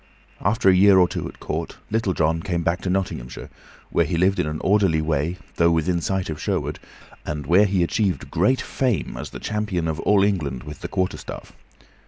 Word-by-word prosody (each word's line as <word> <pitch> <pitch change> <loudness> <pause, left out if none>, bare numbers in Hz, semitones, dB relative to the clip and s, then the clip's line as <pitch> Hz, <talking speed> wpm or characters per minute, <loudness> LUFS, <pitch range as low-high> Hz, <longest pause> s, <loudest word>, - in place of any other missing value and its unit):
After 105 +1 +1
a 95 - +8
year 95 +1 +6
or 90 -1 +6
two - - -4
at - - -12
court - - -4
Little 110 -5 0
John 80 +1 +1
came 85 -1 -2
back 85 +2 0
to 95 - -3
Nottinghamshire, 90 -10 -3 0.4
where - - +3
he 85 - -1
lived 95 +3 +2
in - - +1
an 75 0 -3
orderly 95 -5 +3
way, 80 +2 -1 0.2
though 85 0 +4
within 85 +1 +1
sight 95 +1 -1
of 80 -2 -5
Sherwood, - - -2 0.4
and 75 -1 -4
where 90 +8 +5
he 95 -2 +1
achieved 95 - -1
great 105 +10 +2
fame 125 -6 -1
as - - -6
the - - -8
champion 105 -5 -2
of 80 0 -2
all 100 +2 +3
England 75 -11 -1
with 75 -1 -9
the - - -4
quarterstaff. 95 -1 -4
90 Hz, 200 wpm, -23 LUFS, 80-100 Hz, 0.4 s, a